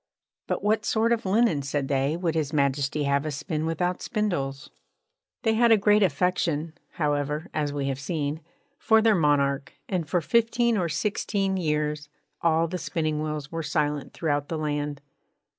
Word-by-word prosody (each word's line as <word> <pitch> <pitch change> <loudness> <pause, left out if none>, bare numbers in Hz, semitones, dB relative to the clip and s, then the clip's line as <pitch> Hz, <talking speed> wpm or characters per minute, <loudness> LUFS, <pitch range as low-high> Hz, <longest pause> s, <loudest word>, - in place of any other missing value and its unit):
'But - - -2
what 215 +1 +2
sort 225 +1 +1
of 230 -4 0
linen,' 195 -6 +3
said 140 0 -2
they, 140 +3 +1
'would 170 -2 -1
His 155 -3 -1
Majesty 140 0 +1
have 140 0 +1
us 155 -2 -3
spin 155 +2 -3
without 180 +2 -1
spindles?' 140 - -2 0.7
They 225 -2 +3
had 235 +1 +4
a 225 - +7
great 210 +1 +4
affection, 165 -2 +1 0.2
however 150 +1 -1
(as 150 -2 -1
we 140 -1 -2
have 135 -1 -2
seen), 150 0 -3 0.4
for 220 0 +4
their 225 -1 +5
monarch; 145 -5 +1
and 175 -6 -2
for 175 - +2
fifteen 235 +7 +2
or 180 -5 0
sixteen 195 +3 -1
years 150 -3 -1 0.3
all 165 0 +3
the 180 +2 -4
spinning 155 -2 -1
wheels 150 -1 -4
were 165 0 -3
silent 150 -2 -1
throughout 145 -3 -1
the 165 - -2
land. 145 -2 -2
155 Hz, 165 wpm, -26 LUFS, 145-185 Hz, 0.7 s, a